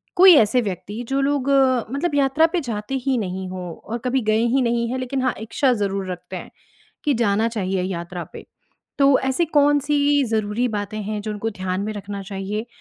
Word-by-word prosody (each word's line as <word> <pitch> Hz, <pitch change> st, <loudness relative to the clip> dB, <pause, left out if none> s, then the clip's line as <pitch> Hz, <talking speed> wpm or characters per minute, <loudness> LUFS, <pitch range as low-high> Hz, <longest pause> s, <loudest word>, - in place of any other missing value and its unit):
कोई 375 Hz, 0 st, +9 dB
ऐसे 245 Hz, +1 st, +4 dB
व्यक्ति 205 Hz, +2 st, -5 dB
जो 275 Hz, +1 st, +1 dB
लोग 280 Hz, -1 st, 0 dB
अ, 260 Hz, -3 st, +4 dB
मतलब 290 Hz, +3 st, -1 dB
यात्रा 280 Hz, +3 st, +4 dB
पे 355 Hz, -, +2 dB
जाते 225 Hz, 0 st, -4 dB
ही 270 Hz, -2 st, +2 dB
नहीं 190 Hz, -3 st, -3 dB
हों, 180 Hz, -2 st, -6 dB
और 230 Hz, +3 st, -6 dB
कभी 255 Hz, +1 st, +1 dB
गए 215 Hz, -, +3 dB, 0.2 s
ही 270 Hz, -, +3 dB
नहीं 235 Hz, -1 st, +1 dB
हैं, 255 Hz, -, -2 dB
लेकिन 255 Hz, +1 st, -2 dB
हाँ 255 Hz, -, +1 dB
इच्छा 245 Hz, +4 st, +1 dB
ज़रूर 195 Hz, -3 st, -2 dB
रखते 180 Hz, -, -7 dB
हैं, -, -, -8 dB, 0.5 s
कि 295 Hz, -3 st, +2 dB
जाना 225 Hz, -1 st, +2 dB
चाहिए 195 Hz, -4 st, -2 dB
यात्रा 175 Hz, -1 st, -4 dB
पे। -, -, -9 dB, 0.5 s
तो 275 Hz, -1 st, +5 dB
ऐसी 265 Hz, +6 st, +1 dB
कौन-सी 290 Hz, 0 st, +3 dB
ज़रूरी 220 Hz, +2 st, 0 dB
बातें 210 Hz, -1 st, -4 dB
हैं, 210 Hz, +1 st, -3 dB
जो 215 Hz, -, -4 dB
उनको 210 Hz, +2 st, -3 dB
ध्यान 185 Hz, -2 st, -3 dB
में 215 Hz, +1 st, -3 dB
रखना 200 Hz, -1 st, -6 dB
चाहिए 200 Hz, +3 st, -4 dB
225 Hz, 195 wpm, -22 LUFS, 200-270 Hz, 0.5 s, कोई